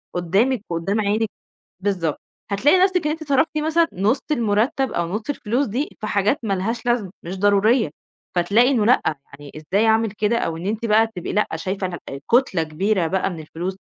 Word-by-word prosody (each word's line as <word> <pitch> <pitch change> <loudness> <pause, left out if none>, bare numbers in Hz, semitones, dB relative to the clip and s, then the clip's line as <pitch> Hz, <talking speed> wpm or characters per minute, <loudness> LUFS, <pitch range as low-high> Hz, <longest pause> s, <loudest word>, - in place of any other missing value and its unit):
قدّامِك 200 +8 +1
وقدّام 175 +6 -1
عينِك 215 +1 0 0.5
بالضبط. 180 -6 -1 0.3
هتلاقي 265 - +4
نَفْسِك 365 -5 +1
إن 300 - +1
أنتِ 315 0 -6
صرفتِ 285 +3 +2
مثلًا 320 +2 +2
نُص 210 +8 +1
المرتّب 235 +2 +1
أو 170 -1 -1
نُص 210 +5 -3
الفلوس 250 +1 -1
دي 250 +8 -2
في 215 - -3
حاجات 205 +6 +1
ما 200 -3 0
لهاش 225 +6 -3
لازمة 235 -6 +1
مش 185 +3 -5
ضرورية، 205 - +3 0.5
فتلاقي 205 +8 +4
إنه 225 -6 +2
لأ، 250 - +5 0.3
يعني 140 0 -12
إزاي 195 +8 0
أعمل 220 -1 +3
كده 215 +2 0
أو 165 -6 -2
إن 175 +3 -6
أنتِ 220 +2 -2
بقى 220 +1 +4
تبقي 180 - -4
لأ، 210 - +2
شايفة 190 +3 -3
إنها 175 -2 -5 0.3
كُتلة 235 -9 +3
كبيرة 180 +3 0
بقى 190 +3 0
من 165 - -7
الفلوس، 175 +4 -5
210 Hz, 185 wpm, -22 LUFS, 185-240 Hz, 0.5 s, لأ